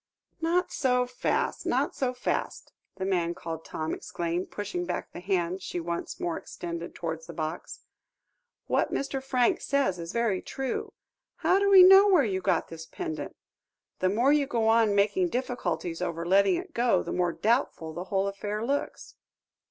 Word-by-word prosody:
"Not 345 Hz, +3 st, +1 dB
so 250 Hz, -2 st, +2 dB
fast, 250 Hz, 0 st, -1 dB
not -, -, 0 dB
so 260 Hz, -2 st, 0 dB
fast," 250 Hz, -, -3 dB, 0.2 s
the 190 Hz, -, -4 dB
man 175 Hz, -3 st, 0 dB
called 160 Hz, -1 st, -6 dB
Tom 155 Hz, 0 st, -4 dB
exclaimed, 175 Hz, +1 st, -3 dB
pushing 200 Hz, -4 st, -4 dB
back 175 Hz, 0 st, -4 dB
the -, -, -8 dB
hand 185 Hz, 0 st, -1 dB
she 180 Hz, -1 st, -4 dB
once 170 Hz, 0 st, -4 dB
more 170 Hz, -2 st, -2 dB
extended 170 Hz, 0 st, -7 dB
towards 160 Hz, -1 st, -5 dB
the 170 Hz, -, -8 dB
box. 155 Hz, +1 st, -5 dB, 0.8 s
"What -, -, +1 dB
Mr. 275 Hz, -1 st, -2 dB
Franks 255 Hz, -2 st, +1 dB
says 270 Hz, -11 st, +1 dB
is 165 Hz, 0 st, -5 dB
very 230 Hz, -5 st, 0 dB
true 270 Hz, -2 st, -4 dB, 0.5 s
how 380 Hz, -, +5 dB
do 400 Hz, 0 st, +2 dB
we 385 Hz, -2 st, +9 dB
know 385 Hz, +2 st, +9 dB
where 360 Hz, -9 st, +5 dB
you 190 Hz, -3 st, -1 dB
got 190 Hz, -, 0 dB
this 160 Hz, -1 st, -9 dB
pendant? 335 Hz, -3 st, -5 dB, 0.6 s
The 185 Hz, -, +2 dB
more 240 Hz, +8 st, +3 dB
you 290 Hz, -2 st, +2 dB
go 230 Hz, -4 st, 0 dB
on 225 Hz, -2 st, +4 dB
making 345 Hz, -, +2 dB
difficulties 180 Hz, -, -3 dB
over 170 Hz, -2 st, -3 dB
letting 200 Hz, -, +4 dB
it 355 Hz, -1 st, -6 dB
go, 235 Hz, -6 st, +2 dB
the -, -, -4 dB
more 180 Hz, -1 st, +1 dB
doubtful 210 Hz, -, 0 dB
the 175 Hz, +3 st, -5 dB
whole 195 Hz, 0 st, 0 dB
affair 205 Hz, +2 st, -3 dB
looks. 280 Hz, +3 st, -3 dB
200 Hz, 170 wpm, -28 LUFS, 175-265 Hz, 0.8 s, we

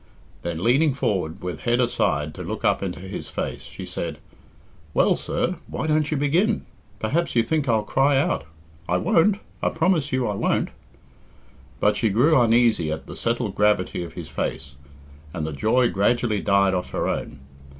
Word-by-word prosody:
Then, 85 Hz, -1 st, -4 dB
leaning 135 Hz, +5 st, +3 dB
forward 95 Hz, -, -1 dB
with 90 Hz, -3 st, -4 dB
head 120 Hz, +1 st, +1 dB
aside 75 Hz, -, +1 dB
to -, -, -8 dB
look -, -, -4 dB
up -, -, +2 dB
into 90 Hz, -2 st, -4 dB
his 95 Hz, +2 st, -7 dB
face, -, -, -4 dB
she -, -, -8 dB
said, 80 Hz, -3 st, -4 dB, 0.8 s
"Well, -, -, +4 dB
sir, 180 Hz, 0 st, -2 dB
why -, -, -4 dB
don't 155 Hz, -1 st, +1 dB
you 155 Hz, -, 0 dB
begin? 175 Hz, +10 st, +1 dB, 0.3 s
Perhaps 145 Hz, -, -1 dB
you 115 Hz, -, +4 dB
think 150 Hz, +2 st, 0 dB
I'll 110 Hz, -2 st, +3 dB
cry 135 Hz, +5 st, +2 dB
out. 135 Hz, -, 0 dB, 0.4 s
I 90 Hz, -, +3 dB
won't 175 Hz, -, +3 dB, 0.2 s
I -, -, +2 dB
promise 160 Hz, -3 st, +1 dB
you 130 Hz, -1 st, +1 dB
I 105 Hz, -, -1 dB
won't." 100 Hz, -, 0 dB, 1.1 s
But -, -, +3 dB
she 110 Hz, -, +2 dB
grew 130 Hz, +11 st, +4 dB
uneasy 115 Hz, -8 st, +3 dB
at 80 Hz, +1 st, -4 dB
the -, -, -9 dB
settled 115 Hz, -3 st, -1 dB
gravity 105 Hz, -4 st, +1 dB
of 85 Hz, -, -9 dB
his -, -, -7 dB
face, 70 Hz, 0 st, -4 dB, 0.6 s
and 80 Hz, -, -2 dB
the 80 Hz, -, -4 dB
joy 115 Hz, -, +2 dB
gradually 105 Hz, +1 st, +1 dB
died 100 Hz, -1 st, +3 dB
off 90 Hz, -1 st, -2 dB
her -, -, 0 dB
own. -, -, -3 dB
115 Hz, 175 wpm, -24 LUFS, 90-140 Hz, 1.1 s, Well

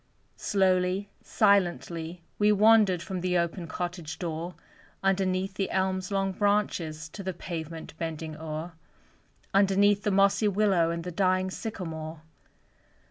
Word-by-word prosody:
Slowly, 190 Hz, 0 st, +1 dB
silently 175 Hz, -4 st, +1 dB, 0.2 s
we 210 Hz, 0 st, +5 dB
wandered 210 Hz, -4 st, +5 dB
From 190 Hz, -3 st, -4 dB
the 180 Hz, 0 st, +1 dB
open 170 Hz, 0 st, -1 dB
cottage 175 Hz, -2 st, -5 dB
door, 170 Hz, 0 st, -4 dB, 0.5 s
Underneath 190 Hz, 0 st, +1 dB
the 195 Hz, -1 st, -2 dB
elm's 190 Hz, -1 st, 0 dB
long 195 Hz, -1 st, 0 dB
branches 185 Hz, -6 st, 0 dB
To 200 Hz, -, -8 dB
the 190 Hz, -2 st, -4 dB
pavement 165 Hz, -2 st, -6 dB
bending 160 Hz, -1 st, -4 dB
o'er; 160 Hz, +2 st, -5 dB, 0.8 s
Underneath 200 Hz, +1 st, +4 dB
the 210 Hz, -, 0 dB
mossy 200 Hz, +2 st, +3 dB
willow 195 Hz, -4 st, +3 dB
And 170 Hz, 0 st, -3 dB
the 180 Hz, -, -5 dB
dying 185 Hz, +1 st, +1 dB
sycamore. 160 Hz, -8 st, -6 dB
185 Hz, 125 wpm, -28 LUFS, 170-195 Hz, 0.8 s, we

